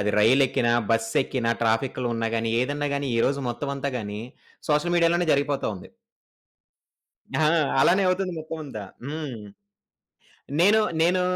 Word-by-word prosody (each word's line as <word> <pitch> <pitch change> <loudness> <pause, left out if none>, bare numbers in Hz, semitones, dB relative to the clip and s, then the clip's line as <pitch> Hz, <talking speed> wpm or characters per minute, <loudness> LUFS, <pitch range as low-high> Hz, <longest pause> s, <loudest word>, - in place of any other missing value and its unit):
అది 105 +1 0
రైలెక్కిన, 125 +2 +3 0.2
బస్సెక్కిన 115 +2 0 0.2
ట్రాఫిక్‌లో 120 +3 0
ఉన్నా 115 0 -1
గాని 115 0 -1
ఏదన్నా 145 +3 -1
గాని 140 -1 -3
ఈ - - +1
రోజు 140 +1 -1
మొత్తం 130 +4 -4
అంతా 140 +1 -2
గాని 105 -1 -5 0.5
సోషల్ 160 +4 +2
మీడియా‌లోనే 170 0 +2
జరిగిపోతావుంది. 140 -9 -2 1.5
ఆ! - - +4 0.4
అలానే 190 +3 +4
అవుతుంది 185 0 0
మొత్తం 160 +1 -6
అంతా. 120 -7 -7 0.2
హ్మ్. 145 -3 -5 1.2
నేను, 205 +5 +5 0.2
నేను 180 +2 +3
140 Hz, 125 wpm, -25 LUFS, 115-160 Hz, 1.5 s, నేను